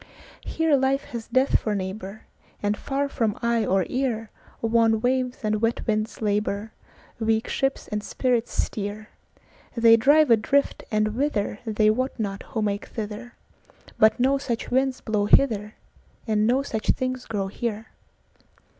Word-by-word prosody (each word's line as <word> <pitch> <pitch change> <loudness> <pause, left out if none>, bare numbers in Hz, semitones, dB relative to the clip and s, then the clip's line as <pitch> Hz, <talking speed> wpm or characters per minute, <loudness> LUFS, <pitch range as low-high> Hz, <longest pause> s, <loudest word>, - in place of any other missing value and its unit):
Here 320 -2 +1
life 270 +1 +1
has 230 -2 -6
death 260 +1 +3
for 215 -2 -2
neighbor, 195 +2 -5 0.4
And 205 0 +1
far 280 +5 -2
from 225 -6 -1
eye 235 -1 +2
or 190 -1 +2
earWan 225 -2 -1
waves 255 +1 0
and 215 0 0
wet 230 +1 0
winds 215 0 -2
labor, 210 +1 -1 0.5
Weak 225 0 +1
ships 270 0 -1
and 210 0 -3
spirits 245 -1 0
steer; 210 +1 -3 0.7
They 230 0 +7
drive 290 +3 +5
adrift, 250 +5 +2
and 215 -1 +1
whitherThey 215 -3 0
wot 255 +3 -2
not 200 -2 -3
who 220 - -2
make 205 0 -2
thither; 220 +2 -7 0.6
But 220 +3 +5
no 270 +2 +3
such 240 -4 -4
winds 260 +1 +1
blow 210 -2 0
hither, 215 -3 +3 0.5
And 215 -1 +1
no 260 +3 +2
such 220 -6 -4
things 255 -1 -3
grow 205 -3 -2
here. 220 +2 -4
225 Hz, 140 wpm, -25 LUFS, 210-255 Hz, 0.7 s, They